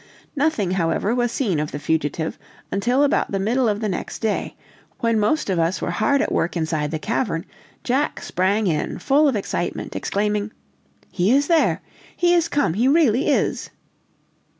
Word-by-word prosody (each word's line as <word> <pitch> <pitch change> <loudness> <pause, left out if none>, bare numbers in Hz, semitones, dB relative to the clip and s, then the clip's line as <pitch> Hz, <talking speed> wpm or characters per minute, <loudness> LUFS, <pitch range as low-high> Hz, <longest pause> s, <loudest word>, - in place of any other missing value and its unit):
Nothing, 280 - +1
however, 185 +4 0
was 240 -1 0
seen 200 - 0
of 150 0 -3
the - - -4
fugitive 160 +1 -2 0.3
until 245 +8 +2
about 285 - +1
the 195 - 0
middle 230 +5 +1
of 210 +1 -1
the 215 - 0
next 185 - -4
day; 220 -2 -2 0.4
when 230 -2 +1
most 215 +10 +1
of 185 -3 0
us 165 +3 +1
were - - -2
hard 280 +10 +2
at - - -3
work 175 +1 0
inside 155 -2 -1
the 160 - -2
cavern, 195 -1 -2 0.4
Jack 265 +4 0
sprang 200 +4 0
in 160 -5 -1
full 295 +2 +3
of 270 - +1
excitement, 195 -3 -3
exclaiming: 210 +1 -1 0.6
"He 185 +3 +1
is 280 +2 +4
there! 330 0 +2 0.3
He 350 0 +3
is 340 -2 +3
come! 285 - +1
he 230 +7 +2
really 275 -3 +3
is!" - - 0
210 Hz, 175 wpm, -22 LUFS, 175-265 Hz, 0.6 s, is